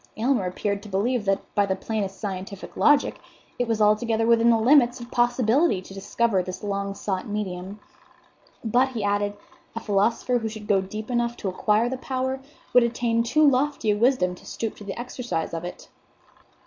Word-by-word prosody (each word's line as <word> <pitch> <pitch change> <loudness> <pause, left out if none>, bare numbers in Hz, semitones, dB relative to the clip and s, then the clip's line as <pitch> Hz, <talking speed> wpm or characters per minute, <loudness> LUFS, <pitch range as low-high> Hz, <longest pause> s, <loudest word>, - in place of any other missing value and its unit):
Aylmer 230 -4 +1
appeared 200 +2 -2
to 210 - -11
believe 210 +4 0
that, 195 0 +1
by 205 -1 +2
the 190 - 0
plainest 195 -1 -4
scientific 195 -1 -6
logic, 290 -1 +3 0.4
it 245 - 0
was 225 -1 0
altogether 220 +2 +2
within 230 0 +4
the 230 - +5
limits 245 +1 +4
of 240 0 -10
possibility 240 - +2
to 185 +1 -12
discover 200 +1 0
this 185 +1 -7
long 200 -1 -2
sought 190 -2 -3
medium; 200 -1 -4 0.9
"but," 245 +4 +3
he 225 -4 -3
added, 205 0 0 0.4
"a - - -2
philosopher 230 +4 +1
who 225 -1 -3
should 215 -1 -9
go 200 -2 +3
deep 215 +5 -6
enough 240 0 0
to 195 - -3
acquire 210 +5 +1
the 260 +1 -3
power 260 0 -2 0.3
would 250 - +7
attain 235 -1 +1
too 290 +6 +3
lofty 275 -4 +2
a - - +2
wisdom 220 -5 +2
to 180 - -14
stoop 225 -2 -4
to - - -10
the 200 +2 -6
exercise 240 -9 -4
of 165 0 -4
it." 175 - -8
220 Hz, 185 wpm, -25 LUFS, 200-240 Hz, 0.9 s, would